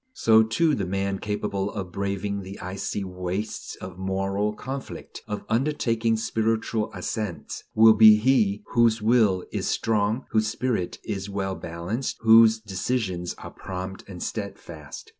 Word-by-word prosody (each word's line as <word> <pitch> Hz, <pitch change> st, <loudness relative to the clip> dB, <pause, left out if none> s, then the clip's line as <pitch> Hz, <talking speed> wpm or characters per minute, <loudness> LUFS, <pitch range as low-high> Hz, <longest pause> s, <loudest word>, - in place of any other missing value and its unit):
So, 110 Hz, -, +5 dB
too, 115 Hz, +9 st, +2 dB
the 100 Hz, -8 st, -1 dB
man 100 Hz, +1 st, -1 dB
capable 105 Hz, -1 st, -2 dB
of 95 Hz, -4 st, -5 dB
braving 100 Hz, +1 st, -2 dB
the 95 Hz, +1 st, -9 dB
icy 95 Hz, +2 st, -4 dB
wastes 90 Hz, +3 st, -4 dB
of 90 Hz, 0 st, -9 dB
moral 95 Hz, +2 st, -1 dB
conflict, 135 Hz, +4 st, -7 dB
of 105 Hz, -, -5 dB
undertaking 115 Hz, -3 st, +1 dB
spiritual 110 Hz, 0 st, -1 dB
ascents, 100 Hz, -3 st, -5 dB
will 110 Hz, 0 st, +8 dB
be 110 Hz, 0 st, +9 dB
he 105 Hz, -3 st, +2 dB
whose 115 Hz, -1 st, +3 dB
will 105 Hz, -5 st, +3 dB
is -, -, -2 dB
strong, 110 Hz, +2 st, 0 dB
whose 110 Hz, -1 st, +2 dB
spirit 110 Hz, -4 st, -2 dB
is 100 Hz, -2 st, -4 dB
well 100 Hz, -1 st, -2 dB
balanced, 90 Hz, +9 st, -4 dB
whose 115 Hz, 0 st, +7 dB
decisions 95 Hz, -3 st, -2 dB
are -, -, -10 dB
prompt 95 Hz, 0 st, -6 dB
and 90 Hz, -3 st, -7 dB
stedfast. 85 Hz, -8 st, -7 dB
105 Hz, 140 wpm, -25 LUFS, 95-110 Hz, -, be